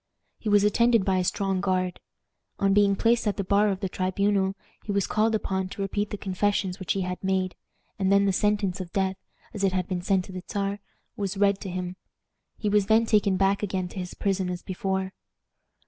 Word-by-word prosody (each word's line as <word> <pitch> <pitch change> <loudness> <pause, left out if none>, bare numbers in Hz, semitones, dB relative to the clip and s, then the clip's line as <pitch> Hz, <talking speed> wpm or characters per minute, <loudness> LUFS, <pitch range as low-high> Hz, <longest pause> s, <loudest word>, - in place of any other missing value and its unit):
He 215 - -3
was 205 -1 +5
attended 230 0 +3
by 190 -1 +2
a - - +1
strong 190 +1 0
guard. 185 -2 0 0.6
On 195 0 +2
being 200 -1 +4
placed 230 +1 +2
at 205 - 0
the 200 - -1
bar 205 +2 +3
of 195 0 -2
the 195 - 0
tribunal, 190 +1 0 0.3
he 210 - -4
was 200 -1 +1
called 220 +1 +1
upon 190 -3 -2
to 200 - -6
repeat 205 +1 -2
the 205 - -4
confessions 195 -1 -1
which 185 - -1
he 195 - -1
had 180 0 -4
made, 190 -1 0 0.5
and 190 0 +2
then 200 0 +5
the 195 - +2
sentence 205 -2 +1
of 175 -2 -8
death, 190 -1 +1 0.4
as 205 -3 -4
it 190 -1 +2
had 185 -2 -1
been 180 -2 -2
sent 190 0 +1
to - - -11
the 185 0 -6
Czar, 200 0 -2 0.4
was 200 -1 -3
read 200 0 +3
to 195 - -6
him. 180 0 -4 0.6
He 210 - -3
was 205 -1 +3
then 225 +1 +4
taken 205 -3 +3
back 195 +1 +2
again 185 -3 -2
to 190 - -7
his 180 -1 -6
prison 195 -2 0
as 180 0 -5
before. 190 0 -2
195 Hz, 215 wpm, -26 LUFS, 185-205 Hz, 0.6 s, was